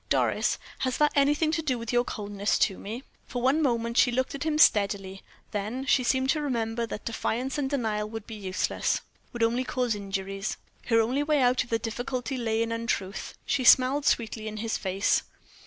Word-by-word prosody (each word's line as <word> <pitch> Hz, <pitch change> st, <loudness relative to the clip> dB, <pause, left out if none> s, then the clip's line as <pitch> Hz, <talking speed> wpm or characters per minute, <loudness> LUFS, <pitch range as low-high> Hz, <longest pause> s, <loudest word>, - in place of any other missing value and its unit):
"Doris, -, -, +2 dB, 0.2 s
has 255 Hz, -1 st, -1 dB
that 300 Hz, 0 st, +4 dB
anything 295 Hz, +3 st, +3 dB
to 325 Hz, 0 st, 0 dB
do 265 Hz, -5 st, 0 dB
with 230 Hz, 0 st, -5 dB
your 240 Hz, 0 st, +4 dB
coldness 205 Hz, -2 st, -2 dB
to 195 Hz, -, +1 dB
me?" 230 Hz, +6 st, -6 dB, 0.2 s
For 245 Hz, -, -4 dB
one 265 Hz, +6 st, +2 dB
moment 235 Hz, -4 st, 0 dB
she 245 Hz, -, +5 dB
looked 260 Hz, +2 st, -1 dB
at 280 Hz, +2 st, -4 dB
him 310 Hz, -1 st, +1 dB
steadily, 200 Hz, -7 st, +3 dB, 0.3 s
then 215 Hz, +6 st, -3 dB
she 265 Hz, -1 st, +3 dB
seemed 260 Hz, +2 st, +2 dB
to 305 Hz, -, 0 dB
remember 235 Hz, -4 st, -1 dB
that 210 Hz, -, -7 dB
defiance 245 Hz, +4 st, -2 dB
and 270 Hz, -2 st, -1 dB
denial 220 Hz, -6 st, -1 dB
would 225 Hz, -1 st, -7 dB
be 225 Hz, -, -9 dB
useless 195 Hz, -3 st, -1 dB, 0.3 s
would 240 Hz, -1 st, -2 dB
only 235 Hz, +3 st, +2 dB
cause 250 Hz, -2 st, -1 dB
inquiries. 195 Hz, 0 st, -4 dB, 0.3 s
Her 230 Hz, -1 st, +4 dB
only 250 Hz, +6 st, 0 dB
way 295 Hz, 0 st, +2 dB
out 250 Hz, -1 st, +3 dB
of -, -, -16 dB
the 230 Hz, -, +2 dB
difficulty 245 Hz, +3 st, -3 dB
lay 225 Hz, -2 st, 0 dB
in 230 Hz, -, -4 dB
untruth. 230 Hz, -4 st, -3 dB
She 275 Hz, -2 st, 0 dB
smiled 265 Hz, +3 st, +5 dB
sweetly 220 Hz, -1 st, 0 dB
in 215 Hz, 0 st, -5 dB
his 225 Hz, +1 st, -2 dB
face. 195 Hz, +1 st, +1 dB
235 Hz, 195 wpm, -27 LUFS, 215-260 Hz, 0.3 s, she